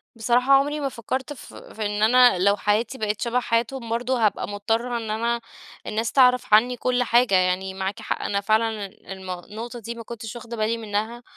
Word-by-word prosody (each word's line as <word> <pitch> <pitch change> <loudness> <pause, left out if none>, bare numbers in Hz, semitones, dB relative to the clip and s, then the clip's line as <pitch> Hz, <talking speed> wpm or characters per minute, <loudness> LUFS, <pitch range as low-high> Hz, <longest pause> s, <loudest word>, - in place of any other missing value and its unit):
بصراحة 245 +4 +2
عمري 290 +2 +3
ما 275 - -1
فكَّرت 260 +4 -4
ف 260 - -13
في 215 -1 -7
إن 210 +1 -1
أنا 245 -3 +6
لو 200 +2 +3
حياتي 215 +6 0
بقت 210 -1 -2
شبه 240 +1 +1
حياتهم، 235 +1 -1
برضه 240 0 0
هابقى 210 - 0
مضطرة 225 +4 -1
إن 220 -2 -4
أنا 235 +2 -1 0.5
الناس 225 +1 -1
تعرف 250 -4 +4
عني 245 +3 +5
كل 250 0 +1
حاجة. 235 -4 +3
يعني 185 +1 +1
معاكِ 190 +1 -4
حق، - - -3
أنا 200 0 -1
فعلًا 220 -1 +1 0.3
المو 185 -1 -6
النقطة 230 +6 -8
دي 230 +2 -6
ما 230 - -8
كنتش 225 0 -8
واخدة 235 0 -8
بالي 220 +2 0
منها، 220 +2 -3
230 Hz, 190 wpm, -24 LUFS, 210-245 Hz, 0.5 s, أنا